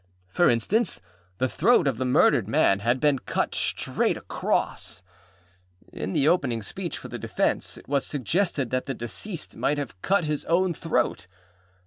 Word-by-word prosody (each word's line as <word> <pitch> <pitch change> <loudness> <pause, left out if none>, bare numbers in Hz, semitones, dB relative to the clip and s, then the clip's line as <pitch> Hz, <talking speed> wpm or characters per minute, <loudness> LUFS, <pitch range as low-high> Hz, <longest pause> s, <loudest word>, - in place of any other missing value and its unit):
For 175 - +3
instance: 190 - +1 0.4
the 130 - +1
throat 185 - +3
of 130 -5 -1
the 130 - 0
murdered 125 - +4
man 95 - +3
had 120 +5 +1
been 145 -2 +2
cut - - -2
straight - - 0
across. 90 - -2 0.9
In 95 - -4
the 140 - +2
opening 130 -10 +1
speech - - -5
for - - -9
the - - -6
defence, - - -1
it - - -14
was 140 +1 +1
suggested 145 - -1
that 130 +1 -1
the 135 - -2
deceased 155 - -6
might 145 - 0
have 130 -10 -6
cut 195 -3 +2
his 150 -1 -2
own 175 +2 +2
throat. 150 - -1
140 Hz, 160 wpm, -26 LUFS, 120-170 Hz, 0.9 s, murdered